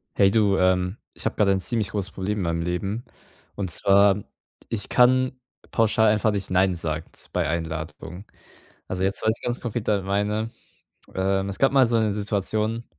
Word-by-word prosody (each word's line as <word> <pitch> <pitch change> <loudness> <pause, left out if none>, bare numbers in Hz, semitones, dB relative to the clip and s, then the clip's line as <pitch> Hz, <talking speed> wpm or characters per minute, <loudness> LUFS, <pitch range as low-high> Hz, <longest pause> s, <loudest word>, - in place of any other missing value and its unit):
Hey 100 -1 +5
du, 100 -3 +3
ähm, 90 +2 +2 0.2
ich - - -8
habe - - 0
gerade 100 -2 +3
'n 95 -1 +1
ziemlich 110 -3 0
großes 100 -2 -2
Problem 105 +2 -3
in - - -1
meinem 85 -1 -1
Leben. 95 +7 -3 0.5
Und 95 -4 -3
zwar, 100 +2 +4 0.4
ich 105 -3 -3
kann 130 +1 +3 0.3
pauschal 110 -1 +3
einfach 105 +1 +2
nicht 100 -2 -3
nein 95 0 +2
sagen 80 -1 -3
s - - -10
bei - - -1
Einladung. 80 +2 -5 0.6
Also, 95 0 -3
jetzt 95 +1 0
was 110 +1 +2
ich - - -16
ganz 120 0 -2
konkret 120 -2 -4
da 105 -2 +2
meine, 105 +3 -1 0.6
ähm, 95 +1 0
es 100 - -4
gab 135 - +4
mal 135 -2 +5
so 115 0 +1
'ne 110 -2 +1
Situation, 105 +2 -1
100 Hz, 185 wpm, -24 LUFS, 95-110 Hz, 0.6 s, Hey